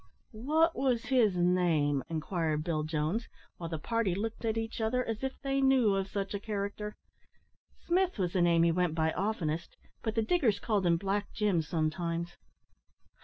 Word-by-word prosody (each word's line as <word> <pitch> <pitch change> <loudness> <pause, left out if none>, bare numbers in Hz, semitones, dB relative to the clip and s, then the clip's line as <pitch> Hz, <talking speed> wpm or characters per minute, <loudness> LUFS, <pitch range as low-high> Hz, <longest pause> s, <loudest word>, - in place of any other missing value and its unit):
"Wot 310 +9 +2
wos 250 -4 +1
his 225 -8 +3
name?" 170 -6 +2
inquired 160 -1 -1
Bill 160 -2 -1
Jones, 155 +8 -1 0.3
while 165 -2 -5
the 160 - -3
party 225 +2 0
looked 220 +4 -4
at 225 -1 0
each 225 0 -3
other 250 +3 +1
as 225 +2 -3
if 265 0 -3
they 275 0 0
knew 260 -6 +4
of 195 0 0
such 195 0 -3
a 200 - -2
character. 210 0 -4 0.9
"Smith 365 -1 +1
was 180 -3 -1
the 185 - +2
name 170 -1 +4
he 170 - +4
went 175 -1 0
by 160 -1 +1
oftenest, 170 -5 -2 0.2
but 220 -1 -2
the 225 - +2
diggers 230 - +2
called 205 -5 0
him 170 -1 +4
Black 200 +3 -2
Jim 205 -6 +2
sometimes." 170 +2 -2
195 Hz, 170 wpm, -31 LUFS, 170-225 Hz, 0.9 s, knew